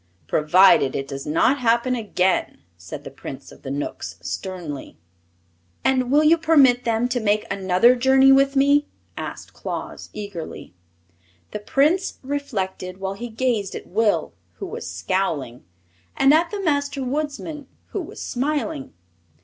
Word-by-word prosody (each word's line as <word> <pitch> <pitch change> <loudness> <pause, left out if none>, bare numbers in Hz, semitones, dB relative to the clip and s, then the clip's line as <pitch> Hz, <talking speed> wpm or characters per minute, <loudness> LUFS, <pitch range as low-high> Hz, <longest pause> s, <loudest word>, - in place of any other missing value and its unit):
"Provided 150 - +4
it 135 - -3
does 135 +1 -6
not 170 - +2
happen 235 +1 +2
again," 190 - 0
said 85 0 -9
the - - -9
Prince - - -9
of - - -16
the - - -7
Knooks, 135 - -5
sternly. 165 - -6 0.9
"And 255 -2 +2
will 295 +3 +4
you 325 +2 +5
permit 275 -6 +4
them 230 +1 +1
to 245 - 0
make 210 -1 +1
another 195 +4 +4
journey 265 +2 +5
with 275 +1 +4
me?" 285 +2 +4 0.3
asked - - -7
Claus, - - -6
eagerly. 200 - -7 0.8
The 210 - -4
Prince 300 - +1
reflected 195 -10 -4
while 195 0 -3
he 235 +4 -7
gazed 225 -4 -1
at - - -7
Will, 205 - 0 0.2
who - - -7
was - - -6
scowling, 130 - -2 0.5
and 270 +2 +5
at 335 +2 +3
the 410 -1 -4
Master 285 -4 0
Woodsman, 295 +1 -4 0.2
who - - -3
was - - -9
smiling. 290 +2 -2
235 Hz, 140 wpm, -22 LUFS, 185-275 Hz, 0.9 s, you